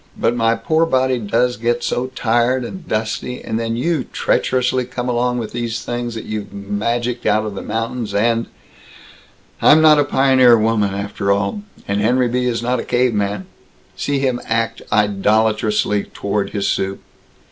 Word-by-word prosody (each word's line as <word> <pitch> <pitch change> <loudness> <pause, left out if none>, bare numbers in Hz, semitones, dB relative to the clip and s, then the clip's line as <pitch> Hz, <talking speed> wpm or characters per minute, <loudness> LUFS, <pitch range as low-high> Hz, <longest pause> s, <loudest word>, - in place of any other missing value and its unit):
But 120 - +1
my 115 -1 +2
poor 160 +3 +1
body 130 -3 +1
does 120 +3 0
get 120 +2 -1
so 125 +1 -1
tired 120 +2 +1
and 180 +6 -9
dusty, 110 +3 -2
and 110 0 -2
then 115 0 -2
you 150 +4 0
treacherously 130 0 0
come 125 0 -5
along 125 0 0
with 115 -3 -4
these 115 -1 -3
things 120 -1 -3
that 110 - -6
you've 105 -1 -5
magicked 115 +5 -2
out 110 +1 +2
of 105 - -4
the 100 - -6
mountains 115 -1 -3
and 115 +2 +1 1.1
I'm 155 - +7
not 155 -1 +6
a - - +4
pioneer 130 -4 +5
woman, 105 -3 +1
after 100 0 -2
all. 100 - 0 0.3
And 100 +1 0
Henry 125 +3 +2
B. 125 +1 -1
is 120 -1 -1
not 125 +1 0
a - - -3
caveman. 105 -6 0 0.5
See 145 -1 -1
him 130 -3 0
act 115 0 -1
idolatrously 105 0 +1
toward 100 0 -3
his 100 -2 -2
soup." 95 0 -2
115 Hz, 165 wpm, -19 LUFS, 105-125 Hz, 1.1 s, I'm